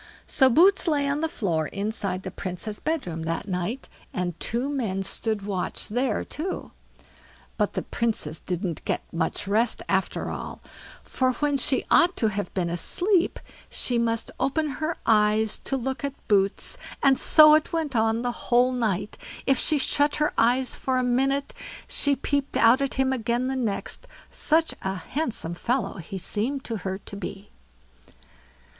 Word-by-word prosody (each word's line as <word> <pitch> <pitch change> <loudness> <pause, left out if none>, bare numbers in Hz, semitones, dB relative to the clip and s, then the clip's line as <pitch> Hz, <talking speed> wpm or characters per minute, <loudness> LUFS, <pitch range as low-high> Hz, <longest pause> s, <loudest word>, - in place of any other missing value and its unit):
So 265 -2 +4
Boots 370 +9 +5
lay 290 -3 +2
on 285 +2 0
the 320 - 0
floor 170 - -1
inside 200 -2 -3
the - - -5
Princess' 195 +3 -5
bedroom 265 - -2
that 165 +4 -3
night, 185 +7 -3 0.2
and 180 -1 -2
two 240 +4 -1
men 225 -10 -2
stood 215 +1 -2
watch 195 -3 -2
there 250 +5 0
too; 360 +5 -5 0.8
but - - 0
the - - -2
Princess 215 -10 -2
didn't 180 -2 -3
get - - -1
much 165 +4 -2
rest 220 +4 +1
after - - -1
all; - - -6 0.4
for 255 -1 0
when 290 +3 0
she 265 0 +1
ought 355 +1 +5
to 220 - +2
have 205 0 -3
been 180 -3 0
asleep, 355 - +2 0.3
she 245 -2 +1
must 230 -1 -1
open 305 +3 0
her 320 +2 -1
eyes 215 0 +3
to 270 - 0
look 265 +2 -3
at 280 -1 -2
Boots, 195 -1 +1 0.2
and 270 -1 +5
so 305 -1 +8
it 310 0 +3
went 320 -5 -2
on 225 +1 +2
the 245 - 0 0.2
whole 245 +1 +4
night. 215 -5 -2 0.3
If 270 -2 +3
she 310 - +3
shut 290 +1 +2
her 300 0 +1
eyes 250 +3 +2
for 260 -1 -1
a 255 - +1
minute, 270 +3 +1 0.3
she 285 -1 +2
peeped 280 +1 -1
out 235 +4 +5
at 275 - -1
him 265 0 +2
again 240 0 -1
the 265 +1 -1
next, 245 - -2 0.2
such 320 +1 +2
a 190 0 -2
handsome 225 - -2
fellow 230 +2 -1
he 180 +3 -7
seemed 235 +9 -1
to 225 - -3
her 190 -1 -4
to 200 - -10
be. 200 +1 -7
240 Hz, 165 wpm, -25 LUFS, 200-275 Hz, 0.8 s, so